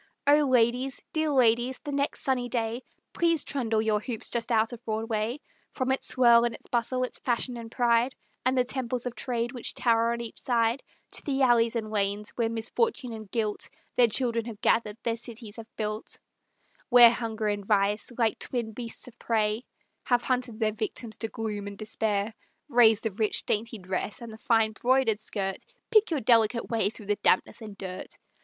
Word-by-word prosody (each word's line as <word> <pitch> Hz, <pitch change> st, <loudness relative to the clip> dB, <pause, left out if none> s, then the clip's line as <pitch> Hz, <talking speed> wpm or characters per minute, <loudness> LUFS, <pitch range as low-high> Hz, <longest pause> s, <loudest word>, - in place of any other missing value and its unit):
O! 295 Hz, +1 st, +5 dB
ladies, 250 Hz, +1 st, +2 dB
dear 315 Hz, -1 st, +1 dB
ladies, 250 Hz, -1 st, +3 dB
the 290 Hz, -, -7 dB
next 280 Hz, 0 st, -1 dB
sunny 250 Hz, -2 st, 0 dB
day, 230 Hz, 0 st, -2 dB, 0.3 s
Please 335 Hz, -3 st, +2 dB
trundle 230 Hz, -6 st, -1 dB
your 215 Hz, -1 st, +2 dB
hoops 225 Hz, 0 st, -3 dB
just 235 Hz, 0 st, -2 dB
out 225 Hz, +1 st, +2 dB
of 240 Hz, 0 st, -10 dB
Broadway, 220 Hz, +2 st, -2 dB, 0.3 s
From 260 Hz, -1 st, -2 dB
its 265 Hz, -, 0 dB
swirl 235 Hz, -2 st, +6 dB
and 235 Hz, -1 st, 0 dB
its -, -, -14 dB
bustle, 250 Hz, +2 st, 0 dB
its 250 Hz, -, -4 dB
fashion 245 Hz, 0 st, -1 dB
and 230 Hz, -1 st, -8 dB
pride 240 Hz, +1 st, +2 dB, 0.3 s
And 260 Hz, +1 st, +1 dB
the 250 Hz, -, +4 dB
temples 250 Hz, -1 st, -3 dB
of 245 Hz, -, -3 dB
Trade 240 Hz, -1 st, -2 dB
which 245 Hz, -3 st, -2 dB
tower 230 Hz, -1 st, +2 dB
on 235 Hz, -, -2 dB
each 235 Hz, -1 st, -7 dB
side, 235 Hz, +1 st, +1 dB, 0.3 s
To -, -, -4 dB
the 275 Hz, -2 st, 0 dB
alleys 235 Hz, -2 st, +4 dB
and 215 Hz, -2 st, -3 dB
lanes, 205 Hz, 0 st, -1 dB
where 230 Hz, -2 st, -1 dB
Misfortune 240 Hz, -, -1 dB
and 215 Hz, -2 st, -9 dB
Guilt 215 Hz, -2 st, -2 dB, 0.2 s
Their 245 Hz, -, +5 dB
children 230 Hz, 0 st, +1 dB
have 225 Hz, -3 st, -8 dB
gathered, 215 Hz, -2 st, +1 dB
their 230 Hz, -1 st, -1 dB
city 230 Hz, -2 st, -8 dB
have 225 Hz, -1 st, -9 dB
built; 215 Hz, 0 st, -4 dB, 0.7 s
Where 240 Hz, -2 st, +9 dB
Hunger 225 Hz, -2 st, -3 dB
and 205 Hz, -1 st, -2 dB
Vice, 205 Hz, +2 st, +1 dB
like 230 Hz, -3 st, +1 dB
twin 235 Hz, -3 st, -3 dB
beasts 230 Hz, +2 st, -6 dB
of 250 Hz, -1 st, -14 dB
prey, 220 Hz, +1 st, 0 dB, 0.4 s
Have 245 Hz, -1 st, +2 dB
hunted 250 Hz, -3 st, -1 dB
their 215 Hz, -2 st, +1 dB
victims 220 Hz, +1 st, -4 dB
to 225 Hz, -, -3 dB
gloom 210 Hz, -2 st, -4 dB
and 200 Hz, 0 st, -8 dB
despair; 215 Hz, 0 st, -1 dB, 0.4 s
Raise 225 Hz, -4 st, +5 dB
the 225 Hz, -, -2 dB
rich, 215 Hz, +2 st, -1 dB
dainty 225 Hz, +2 st, -1 dB
dress, 185 Hz, +1 st, -4 dB
and 235 Hz, -2 st, -9 dB
the 220 Hz, -, -12 dB
fine 225 Hz, -2 st, +2 dB
broidered 240 Hz, -1 st, +2 dB
skirt, 195 Hz, -3 st, -2 dB, 0.3 s
Pick 440 Hz, -1 st, +5 dB
your 310 Hz, -5 st, -1 dB
delicate 230 Hz, 0 st, +3 dB
way 225 Hz, -3 st, +2 dB
through 215 Hz, -1 st, -12 dB
the 205 Hz, 0 st, 0 dB
dampness 185 Hz, -, +1 dB
and 210 Hz, -2 st, -9 dB
dirt. 185 Hz, -1 st, -7 dB
230 Hz, 190 wpm, -27 LUFS, 220-245 Hz, 0.7 s, Where